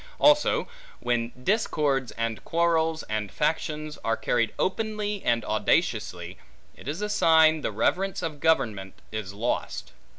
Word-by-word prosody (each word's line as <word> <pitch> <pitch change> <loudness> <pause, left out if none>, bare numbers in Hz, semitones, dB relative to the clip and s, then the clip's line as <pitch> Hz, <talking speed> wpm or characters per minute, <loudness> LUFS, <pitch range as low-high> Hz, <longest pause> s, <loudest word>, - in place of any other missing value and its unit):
Also, 295 0 +4 0.3
when 120 -1 -1
discords, 145 - +1
and 115 -1 -3
quarrels, 165 -1 +1
and 110 -1 -3
factions 155 0 -2
are 115 0 0
carried 115 -3 +1
openly 210 0 -1
and 115 -1 +1
audaciously, 105 - 0 0.4
it - - -13
is 160 +8 -3
a - - 0
sign 160 -5 +4
the - - -2
reverence 185 - 0
of 155 -3 -4
government 110 - +1 0.2
is 110 -3 -4
lost. 110 +5 -3
150 Hz, 130 wpm, -26 LUFS, 110-165 Hz, 0.4 s, Also